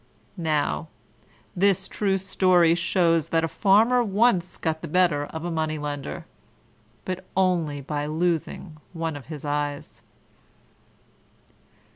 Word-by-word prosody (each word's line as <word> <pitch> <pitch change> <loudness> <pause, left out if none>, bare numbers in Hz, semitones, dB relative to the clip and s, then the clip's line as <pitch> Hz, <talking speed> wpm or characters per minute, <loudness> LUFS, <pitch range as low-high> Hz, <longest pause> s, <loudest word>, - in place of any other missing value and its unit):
Now, 155 - -1 0.7
this 190 0 +2
true 195 -2 0
story 185 -3 +3
shows 170 -2 +1
that 165 0 +1
a - - +1
Farmer 220 +8 +3
once 200 -4 +1
got 160 -1 -2
the - - -5
better 170 -3 +2
of 160 +1 -7
a 175 - -2
Money 155 -1 -1
lender 145 +2 -5 0.8
but 185 0 -4
only 170 -6 +1
by 145 +1 -3
losing 160 0 -2 0.2
one 165 -2 -3
of 145 - -10
his 150 -2 -7
eyes. 145 0 -3
165 Hz, 120 wpm, -25 LUFS, 150-185 Hz, 0.8 s, story